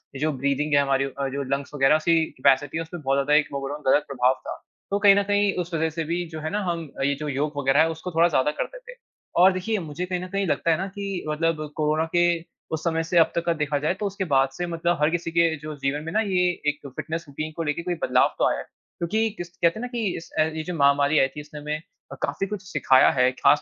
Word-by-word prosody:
ये - - -6
जो 155 0 +2
ब्रीदिंग 140 +2 0
है 140 - +6
हमारी 135 -1 +1
अ, 135 0 -3
जो 140 +1 -3
लंग्स 140 +1 -4
वग़ैरह 140 +2 +4
सी 165 - +5 0.2
कैपेसिटी 135 +4 +2
है - - -1
उसपे 175 +2 -8
बहुत 135 -3 0
ज़्यादा 140 +2 +1
एक 150 - -4
ओवरऑल 140 +2 -4
गलत 145 - +4
प्रभाव 130 -1 +2
था। - - -5 0.3
तो 200 - +1
कहीं 200 -1 +7
न 200 - +3
कहीं 205 0 +2
उस 170 0 -14
वजह 160 0 +1
से - - +1
भी 170 +2 -2
जो 160 -2 -7
है 155 - -3
ना 210 - 0
हम 165 -3 -3 0.2
ये 140 - +2
जो 150 - -4
योग 145 +2 -1
वग़ैरह 135 +1 +2
है 165 - +3
उसको 165 +3 -6
थोड़ा 165 +1 +4
ज़्यादा 150 -2 +2
करते - - -5
थे। - - -9 0.5
और 190 +1 +8
देखिए 200 +3 -1
मुझे 165 +2 -5
कहीं 180 0 -2
न - - -6
कहीं 195 0 -1
लगता 170 - +1
है 160 - +2
ना 190 +2 -3
कि 195 -2 -4
मतलब 155 0 -1
कोरोना 155 +1 +1
के 175 - +5 0.5
उस 160 0 -3
समय 165 -1 0
से 170 +2 -1
अब 165 - +5
तक 170 - -1
का 170 - +2
देखा 145 0 0
जाए 155 +5 0
तो 210 - -2
उसके 195 -1 -2
बाद 135 0 +4
से 175 - -2
मतलब 170 +1 0
हर 150 - +4
किसी 170 0 -2
के 165 -1 +3
जो 155 +1 -7
जीवन 140 +2 -2
में 165 - -5
ना 220 - +3
ये 180 -3 +2 0.2
एक 150 - -3 0.2
फ़िटनेस 165 +1 -4
रूटीन 155 +3 -5
को 165 - -2
लेके 150 +2 -2
कोई 175 -1 -2
बदलाव 125 0 +3
तो - - +4
आया - - -1
है। - - -5 0.4
क्योंकि 220 +6 +1
किस 175 0 -6
कहते 170 +4 +2
है - - -6
ना 250 - -3
कि 240 -2 -4 0.2
इस 165 - -10
अ, - - +6
ये 160 0 -3
जो 180 - -5
महामारी 140 +1 +4
आयी 135 - +4
थी 150 - -5
उसने 150 0 -10
हमें 150 +1 -3 0.4
काफ़ी 195 - -1
कुछ 205 -1 -5
सिखाया 130 0 +5
है 125 -1 +3
ख़ास 130 +3 +3
160 Hz, 270 wpm, -24 LUFS, 145-175 Hz, 0.5 s, और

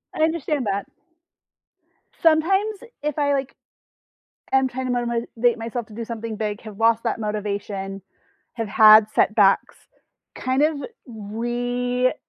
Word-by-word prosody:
I 310 - +1
understand 310 -4 0
that. 200 0 -2 1.3
Sometimes 385 +7 +2 0.2
if 300 -1 -2
I, 285 -1 +2
like, 275 -1 -2 1.0
am 265 0 +3
trying 260 0 -4
to - - -1
motim 245 -1 -1
motivate 235 0 0
myself 230 0 -5
to 215 - -14
do 230 +1 -5
something 230 -1 -5
big, 210 -1 -3
have 215 -3 -10
lost 230 0 +3
that 230 -1 -1
motivation, 200 -2 -4 0.5
have 225 -2 -4
had 215 +1 +7
setbacks, 210 -2 +3 0.6
kind 260 +2 0
of 310 0 +1 0.3
relooking 245 +3 -2
235 Hz, 130 wpm, -23 LUFS, 215-260 Hz, 1.3 s, had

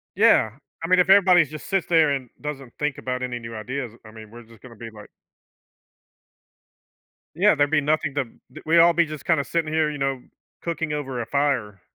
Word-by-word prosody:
Yeah. 110 - +4 0.3
I - - -2
mean 185 +1 +4
if 180 - +3
everybody's 185 -6 +6
just 155 0 -9
sits 195 -3 0
there 160 -3 +4
and 135 -3 -3
doesn't 140 -4 -7
think 150 -2 -2
about 125 0 -4
any 125 -1 -4
new 115 -1 -9
ideas, 125 +2 -5
I 110 - -12
mean, 110 -1 -12
we're 120 +1 -12
just 115 -1 -19
gonna 125 -2 -13
be 115 +1 -9
like 105 -1 -13 2.3
Yeah, 195 +2 +4
there'd 145 -1 +1
be 160 -2 +3
nothing 150 -1 -1
to 145 -2 0 0.3
d - - -11
we 165 +2 +3
all 170 +1 +6
be 170 +1 +3
just 155 -2 -9
kinda 160 -4 +2
sitting 160 +1 -2
here, 155 -1 +1
you 150 - -6
know, 135 -2 -2 0.4
cooking 160 -2 -3
over 135 -4 -4
a - - -5
fire. 125 -9 -1
145 Hz, 205 wpm, -23 LUFS, 125-160 Hz, 2.3 s, everybody's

